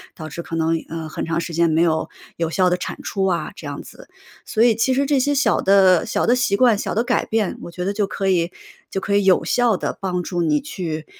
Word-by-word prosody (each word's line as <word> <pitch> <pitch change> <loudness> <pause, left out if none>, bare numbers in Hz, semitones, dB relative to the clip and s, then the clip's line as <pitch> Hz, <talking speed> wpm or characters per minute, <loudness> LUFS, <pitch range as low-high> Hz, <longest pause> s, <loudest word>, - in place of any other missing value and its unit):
导 155 -2 -8
致 170 - -6
可 165 - -6
能， 165 0 0
呃， 160 -1 -5
很 - - -5
长 165 0 -1
时 170 0 -5
间 170 +1 +2
没 160 +1 +3
有 160 -2 0 0.3
有 165 -1 -1
效 180 +1 +2
的 180 - +2
产 - - -6
出 195 -1 -1
啊， 180 -3 -1
这 - - -9
样 - - -6
子。 - - -14 0.4
所 220 - +1
以 235 -2 +5
其 255 +4 +1
实 275 +1 +2
这 280 -1 +2
些 285 +2 +1
小 280 - +2
的 190 -3 +5
小 - - 0
的 245 - +4
习 240 -5 +1
惯、 240 -1 +4
小 - - -3
的 225 - +2
改 - - +1
变， 220 -3 -1
我 - - -7
觉 180 +1 -5
得 200 - -1
就 205 -1 0
可 195 -1 -3
以 175 -2 +1 0.4
就 195 - -2
可 200 +2 -1
以 205 - +3
有 185 -2 +4
效 240 -5 +2
地 - - -3
帮 180 -2 -2
助 175 0 -2
你 295 - +2
去， 170 - -5
190 Hz, 280 characters per minute, -21 LUFS, 170-220 Hz, 0.4 s, 以